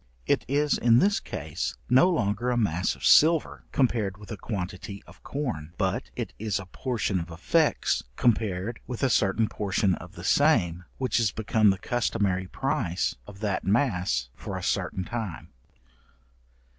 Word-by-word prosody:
It -, -, +1 dB
is 145 Hz, +2 st, +1 dB
in 115 Hz, -1 st, +5 dB
this 200 Hz, +9 st, +3 dB
case 80 Hz, +2 st, -4 dB
no 130 Hz, +9 st, +5 dB
longer 120 Hz, -, 0 dB
a 125 Hz, -, +1 dB
mass 95 Hz, -5 st, +1 dB
of -, -, -7 dB
silver, 160 Hz, 0 st, +5 dB
compared 110 Hz, -7 st, +1 dB
with 105 Hz, +1 st, -12 dB
a -, -, -3 dB
quantity 100 Hz, -1 st, -5 dB
of -, -, -17 dB
corn, 120 Hz, -, -4 dB
but 95 Hz, -2 st, -1 dB
it -, -, -4 dB
is 105 Hz, -2 st, -1 dB
a 95 Hz, -, -6 dB
portion 105 Hz, -1 st, -2 dB
of 85 Hz, 0 st, -6 dB
effects 80 Hz, -, +1 dB
compared 110 Hz, -2 st, 0 dB
with 125 Hz, +1 st, -5 dB
a 130 Hz, -, +3 dB
certain 105 Hz, +2 st, +2 dB
portion 100 Hz, -2 st, 0 dB
of 90 Hz, +1 st, -7 dB
the -, -, -10 dB
same, 90 Hz, -, +3 dB
which 130 Hz, -2 st, +1 dB
is 110 Hz, -3 st, +2 dB
become 110 Hz, -1 st, +2 dB
the 95 Hz, -, +2 dB
customary 100 Hz, -4 st, -1 dB
price 135 Hz, -, -1 dB
of 100 Hz, 0 st, -12 dB
that 100 Hz, -3 st, -1 dB
mass 95 Hz, -, +1 dB
for -, -, -6 dB
a -, -, -6 dB
certain 95 Hz, -, -1 dB
time. 110 Hz, -5 st, -5 dB
105 Hz, 160 wpm, -27 LUFS, 95-120 Hz, -, in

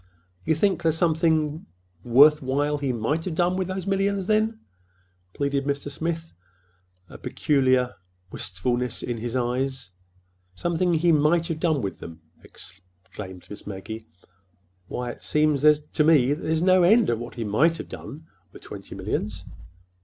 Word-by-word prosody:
"You 160 Hz, -, +2 dB
think—there's 170 Hz, -2 st, +1 dB
something 160 Hz, -2 st, +1 dB, 0.4 s
worth 145 Hz, +6 st, +6 dB
while 145 Hz, +3 st, 0 dB
he 140 Hz, -2 st, -1 dB
might 125 Hz, +8 st, -1 dB
have 175 Hz, -4 st, -3 dB
done 175 Hz, +2 st, +2 dB
with 185 Hz, -1 st, -1 dB
those 185 Hz, -1 st, -4 dB
millions, 195 Hz, 0 st, 0 dB
then?" 220 Hz, +2 st, +1 dB, 0.8 s
pleaded 140 Hz, -1 st, -1 dB
Mr. 140 Hz, 0 st, -2 dB
Smith, 165 Hz, +2 st, -4 dB, 0.7 s
a -, -, -34 dB
sudden -, -, -12 dB
peculiar 130 Hz, -3 st, +1 dB, 0.4 s
wistfulness 120 Hz, +7 st, -2 dB
in 120 Hz, -1 st, -3 dB
his 120 Hz, +2 st, -4 dB
eyes. 125 Hz, -2 st, -2 dB, 0.6 s
"Something 175 Hz, 0 st, 0 dB
he 170 Hz, +2 st, +3 dB
might 160 Hz, +2 st, +3 dB
have 160 Hz, -2 st, -3 dB
done 160 Hz, -5 st, +1 dB
with 100 Hz, -, -4 dB
them!" 85 Hz, -1 st, -10 dB, 0.2 s
exclaimed 90 Hz, 0 st, -11 dB
Miss 105 Hz, 0 st, -10 dB
Maggie. 105 Hz, +2 st, -7 dB, 0.8 s
"Why, 125 Hz, -1 st, -4 dB
it -, -, -14 dB
seems 150 Hz, -2 st, +2 dB, 0.3 s
to 150 Hz, -, +2 dB
me 145 Hz, -4 st, +5 dB
there's 160 Hz, +2 st, -1 dB
no 185 Hz, 0 st, +5 dB
end 215 Hz, +6 st, +5 dB
to 120 Hz, -, +1 dB
what 120 Hz, +1 st, -8 dB
he 115 Hz, -, -3 dB
might 145 Hz, +11 st, +2 dB
have -, -, -8 dB
done—with 95 Hz, -, -12 dB
twenty 95 Hz, -1 st, -9 dB
millions." 95 Hz, -1 st, -3 dB
145 Hz, 145 wpm, -25 LUFS, 120-165 Hz, 0.8 s, worth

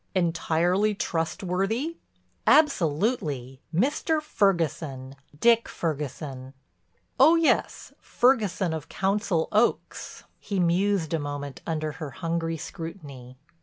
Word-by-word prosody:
"Entirely 175 Hz, +3 st, +1 dB
trustworthy?" 195 Hz, -, -2 dB, 0.5 s
"Absolutely. 155 Hz, -, +2 dB
Mr. 290 Hz, -, +1 dB
Ferguson—Dick 160 Hz, -, 0 dB
Ferguson." 140 Hz, -4 st, -4 dB, 0.6 s
"Oh, 310 Hz, +6 st, +7 dB
yes, 330 Hz, -2 st, +1 dB
Ferguson 210 Hz, -9 st, +1 dB
of 160 Hz, 0 st, -6 dB
Council 195 Hz, -3 st, 0 dB
Oaks." 220 Hz, +3 st, 0 dB, 0.2 s
He 200 Hz, -2 st, -3 dB
mused 180 Hz, -1 st, +1 dB
a 165 Hz, -, +1 dB
moment 145 Hz, -1 st, -5 dB
under 155 Hz, -2 st, -2 dB
her 155 Hz, -1 st, -7 dB
hungry 165 Hz, +3 st, -2 dB
scrutiny. 145 Hz, -7 st, -8 dB
170 Hz, 90 wpm, -26 LUFS, 150-205 Hz, 0.6 s, Oh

